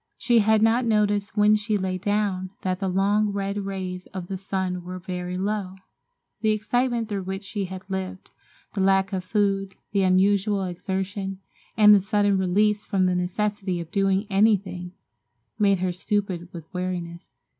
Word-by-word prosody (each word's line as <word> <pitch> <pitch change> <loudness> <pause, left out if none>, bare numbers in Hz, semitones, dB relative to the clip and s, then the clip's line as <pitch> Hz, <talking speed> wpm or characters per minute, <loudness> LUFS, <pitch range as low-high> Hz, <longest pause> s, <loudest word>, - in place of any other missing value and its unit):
She 240 -2 +3
had 220 0 +4
not 230 +3 +4
noticed 210 -2 +1
when 210 0 +6
she 215 0 0
lay 185 -1 -2
down 200 -2 0
that 185 -1 -1
the 195 - -1
long, 200 +3 +2
red 200 0 -2
rays 185 -2 -5
of 180 -2 -5
the 195 - -2
sun 190 -1 -3
were 180 +1 -6
very 180 0 -4
low. 195 -1 -2 0.6
The 220 - +1
excitement 235 +2 0
through 205 -2 -3
which 190 +1 -4
she 200 0 -3
had 185 +1 -7
lived, 190 -1 -5 0.4
the 195 - -1
lack 195 0 +3
of 185 -1 -2
food, 195 -1 0 0.2
the 200 - +2
unusual 195 +2 +3
exertion 190 +2 -3 0.4
and 210 -1 +8
the 200 - +6
sudden 205 -1 +2
release 205 +3 +2
from 190 -3 +1
the 180 - +2
necessity 190 +1 -1
of 170 -1 -7
doing 195 +1 +2
anything, 195 -3 +1 0.7
made 200 -2 +4
her 180 0 -1
stupid 185 -2 -2
with 170 -4 -9
weariness. 180 -2 -4
195 Hz, 165 wpm, -25 LUFS, 185-210 Hz, 0.7 s, and